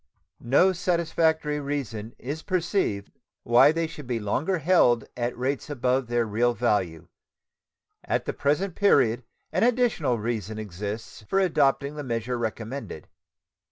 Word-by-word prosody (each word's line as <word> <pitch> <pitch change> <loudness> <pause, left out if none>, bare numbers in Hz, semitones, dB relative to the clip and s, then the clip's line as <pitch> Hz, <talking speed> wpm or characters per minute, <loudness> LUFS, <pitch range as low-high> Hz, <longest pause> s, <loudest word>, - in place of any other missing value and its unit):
No 145 +10 +4
satisfactory 160 -4 0
reason 125 -6 -4
is 145 +5 -5
perceived 175 - -1 0.3
why 120 +5 +6
they 165 +1 -1
should 150 -4 -9
be 120 -2 -1
longer 140 - -1
held 145 -8 +3
at 120 0 -3
rates 135 +4 -2
above 130 -2 0
their 120 0 +1
real 120 +3 +1
value. 95 -8 0 1.0
At - - -1
the - - -2
present 160 +7 0
period 130 - +3 0.3
an 175 +4 0
additional 230 - +2
reason 110 -1 -3
exists 105 +2 -6
for - - +1
adopting 145 -6 +2
the 150 - -4
measure 120 0 -2
recommended. 115 - -5
130 Hz, 130 wpm, -26 LUFS, 115-160 Hz, 1.0 s, why